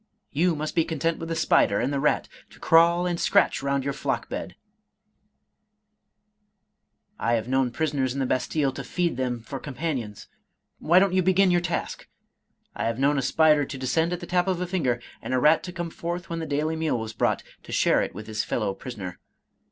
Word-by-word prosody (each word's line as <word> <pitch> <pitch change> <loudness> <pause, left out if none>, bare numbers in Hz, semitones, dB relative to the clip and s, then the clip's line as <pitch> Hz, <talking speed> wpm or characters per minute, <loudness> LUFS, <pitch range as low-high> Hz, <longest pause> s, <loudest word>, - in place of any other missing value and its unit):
You 165 +3 +2
must 155 +1 -4
be 165 - +3
content 165 +1 -1
with 165 - -6
the 165 - -1
spider 160 - +3
and 130 +4 -1
the 140 - 0
rat, 150 +2 +1 0.2
to - - -17
crawl 170 +2 +4
and 175 -1 -1
scratch - - +3
round 140 0 0
your 140 +1 -2
flock - - -3
bed! 90 - -5 2.6
I 115 - +1
have 115 0 0
known 130 0 +2
prisoners 140 -1 -1
in 140 - -4
the 135 - +1
Bastille 135 +2 0
to 135 +1 -7
feed 170 +4 -1
them 125 -2 -2
for 135 +4 -7
com 140 -1 -8
panions, 125 -11 -3 0.3
— - - -46
^why 175 +3 +5
don't 195 -1 +2
you 185 - +3
begin 185 +1 +4
your 175 0 +3
task? 175 -1 -3 0.7
I - - -2
have 115 0 -1
known 140 +2 +2
a - - 0
spider 150 +3 +4
to 135 - -6
descend 160 +6 0
at 180 0 -3
the - - -5
tap 180 +1 +1
of 185 -2 0
a 180 - -1
finger, 150 -10 0 0.2
and 130 - -2
a - - +3
rat 155 +5 +5
to 180 - -6
come 175 -2 -5
forth 170 +1 -5
when 165 - -2
the 160 - -4
daily 150 +2 -1
meal 160 -5 0
was 110 0 -5
brought, - - 0 0.2
to - - -12
share - - +3
it - - -4
with 105 +2 -7
his 110 0 -2
fellow 105 -4 -1
prisoner! 100 -7 -7
150 Hz, 215 wpm, -25 LUFS, 130-170 Hz, 2.6 s, ^why